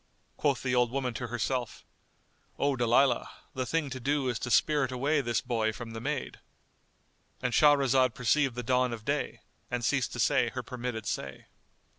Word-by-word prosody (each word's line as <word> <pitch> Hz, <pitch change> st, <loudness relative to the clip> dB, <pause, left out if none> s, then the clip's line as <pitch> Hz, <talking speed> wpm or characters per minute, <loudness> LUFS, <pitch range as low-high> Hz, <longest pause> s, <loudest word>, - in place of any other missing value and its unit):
Quoth 140 Hz, -5 st, 0 dB
the 125 Hz, -2 st, 0 dB
old 125 Hz, -1 st, +3 dB
woman 130 Hz, -1 st, -2 dB
to 120 Hz, +1 st, -4 dB
herself, 120 Hz, +1 st, -3 dB, 0.7 s
"O 140 Hz, -1 st, +1 dB
Dalilah, 120 Hz, +1 st, +3 dB, 0.2 s
the 130 Hz, -1 st, -3 dB
thing 165 Hz, -3 st, 0 dB
to 130 Hz, -, -5 dB
do 140 Hz, +1 st, 0 dB
is 120 Hz, -3 st, -2 dB
to 125 Hz, -, -4 dB
spirit 140 Hz, 0 st, +3 dB
away 140 Hz, +4 st, +1 dB
this 120 Hz, -3 st, 0 dB
boy 110 Hz, -2 st, 0 dB
from 115 Hz, +1 st, -8 dB
the 115 Hz, 0 st, -6 dB
maid,"——And 130 Hz, -2 st, -7 dB
Shahrazad 135 Hz, -4 st, +4 dB
perceived 130 Hz, +1 st, +2 dB
the 125 Hz, -, -4 dB
dawn 125 Hz, 0 st, +1 dB
of 110 Hz, -2 st, -8 dB
day -, -, -2 dB, 0.3 s
and 120 Hz, -1 st, -2 dB
ceased 135 Hz, 0 st, +1 dB
to -, -, -6 dB
say -, -, +3 dB
her -, -, -5 dB
permitted 125 Hz, -3 st, -5 dB
say. 70 Hz, -1 st, -4 dB
125 Hz, 170 wpm, -29 LUFS, 120-135 Hz, 0.7 s, Shahrazad